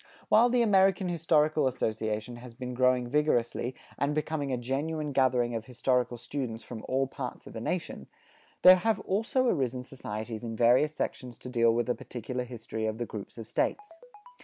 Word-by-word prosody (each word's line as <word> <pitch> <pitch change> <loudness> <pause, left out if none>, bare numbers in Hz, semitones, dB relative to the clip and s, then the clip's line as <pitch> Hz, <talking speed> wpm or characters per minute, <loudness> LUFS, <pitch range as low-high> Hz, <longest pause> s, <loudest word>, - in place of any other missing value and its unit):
While 240 +2 +6
the 245 -1 +3
American 195 -3 +3
Historical 155 -3 +2
Association 110 -1 -2
has 120 -1 -11
been 125 0 -5
growing 125 0 +2
vigorously 125 -3 0 0.2
and 145 +1 0
becoming 155 -2 -2
a 125 - 0
genuine 145 +5 -2
gathering 125 -3 +2
of 115 -1 -4
historical 125 -1 0
students 120 -2 -5
from 115 -3 -8
all 135 +1 +1
parts 135 - -7
of - - -11
the - - -6
nation, - - -3 0.6
there 185 0 +10
have 220 +3 +1
also 225 +6 0
arisen 130 - 0
societies 110 -3 -6
in 115 -1 -4
various 125 +7 +4
sections 125 -2 -4
to 125 - -9
deal 115 -2 +3
with 120 +1 +1
the 125 - +1
particular 125 0 -5
history 115 -2 -5
of 110 0 -3
the 120 - -2
groups 105 -1 -8
of 115 - -7
States. 330 - -2
125 Hz, 175 wpm, -29 LUFS, 120-155 Hz, 0.6 s, there